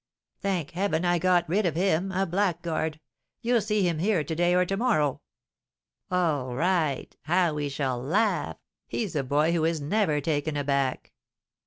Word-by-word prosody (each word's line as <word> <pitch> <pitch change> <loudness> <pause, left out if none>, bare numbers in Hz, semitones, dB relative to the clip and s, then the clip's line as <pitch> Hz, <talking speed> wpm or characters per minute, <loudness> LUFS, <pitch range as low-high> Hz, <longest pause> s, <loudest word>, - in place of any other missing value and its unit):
"Thank 185 -7 -1
heaven, 180 -1 0
I 175 - +3
have 175 - 0
got 180 -1 +3
rid 195 +7 +1
of 160 - -2
him, 190 +1 +1
a 190 +1 0
blackguard! 170 -4 -1 0.4
You'll 235 -1 +3
see 210 -2 +1
him 165 -3 -1
here 185 -2 +1
to 160 - -4
day 175 +2 +2
or 180 0 +3
to 195 - -2
morrow." 195 - +1 0.9
"All 150 -9 0
right; 160 -2 0
how 175 0 +2
we 145 -1 -2
shall 135 -3 -2
laugh! 200 - 0 0.3
He's 210 -8 -3
a 145 - +2
boy 150 +5 +2
who 170 -2 +1
is 165 0 +1
never 155 0 +1
taken 145 0 -1
aback!" 140 -2 -1
170 Hz, 170 wpm, -27 LUFS, 150-190 Hz, 0.9 s, I